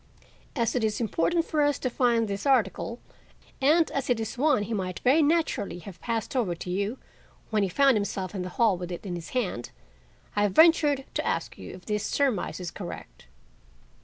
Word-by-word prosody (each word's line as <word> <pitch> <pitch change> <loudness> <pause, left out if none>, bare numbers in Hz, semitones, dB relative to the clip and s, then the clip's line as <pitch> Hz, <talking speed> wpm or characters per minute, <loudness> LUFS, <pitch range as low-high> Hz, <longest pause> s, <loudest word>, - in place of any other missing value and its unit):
As 235 -4 +1
it 245 - +1
is 215 -1 0
important 330 +8 +1
for 305 - 0
us 290 -1 +2
to - - -2
find 235 -2 +2
this 200 +6 -3
article, 235 -2 +1 0.6
and 315 +5 +4
as 275 -2 -2
it 245 -2 +2
is 220 +2 -4
one 270 -4 +2
he 225 - -4
might 185 -3 -2
very 270 +6 +4
naturally 305 - +1
have 180 +1 -11
passed 230 +1 -3
over 210 -9 +1
to 180 +1 -6
you 200 +6 -1 0.5
when 215 -1 +2
he 195 - +1
found 275 +3 +4
himself 195 -2 -3
in 190 - -3
the 180 - -4
hall 220 -6 +4
with 180 0 -5
it 175 - -6
in 185 - -4
his 170 -1 -6
hand, 180 - -2 0.7
I 205 - +2
have 205 -2 +2
ventured 300 - +5
to - - -1
ask - - -2
you - - -8
if 185 - -14
this 210 -1 -1
surmise 255 -6 0
is 180 -2 -5
correct." 80 -6 -9
220 Hz, 200 wpm, -27 LUFS, 190-270 Hz, 0.7 s, ventured